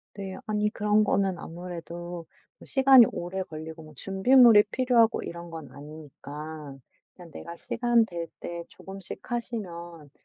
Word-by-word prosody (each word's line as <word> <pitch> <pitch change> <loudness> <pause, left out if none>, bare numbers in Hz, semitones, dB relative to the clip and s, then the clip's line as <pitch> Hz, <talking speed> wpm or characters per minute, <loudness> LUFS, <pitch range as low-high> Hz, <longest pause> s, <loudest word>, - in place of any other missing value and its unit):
네. 195 -2 -6
아니 210 -1 0
그런 210 0 +2
거는 195 -3 +1
아무래도 175 0 -7 0.4
시간이 265 -3 +7
오래 180 +2 -4
걸리고 160 -1 -9
뭐 155 0 -14
준비물이 210 - +6
필요하고 240 -2 +3
이런 170 0 -7
건 160 -4 -9
아니니까 150 0 -9 0.4
그냥 175 -3 -13
내가 170 +2 -9
시간 235 +4 +1
될 170 -5 -5
때 170 0 -6
조금씩 195 -1 -9
하시면 175 - -5
175 Hz, 285 characters per minute, -27 LUFS, 165-215 Hz, 0.4 s, 시간이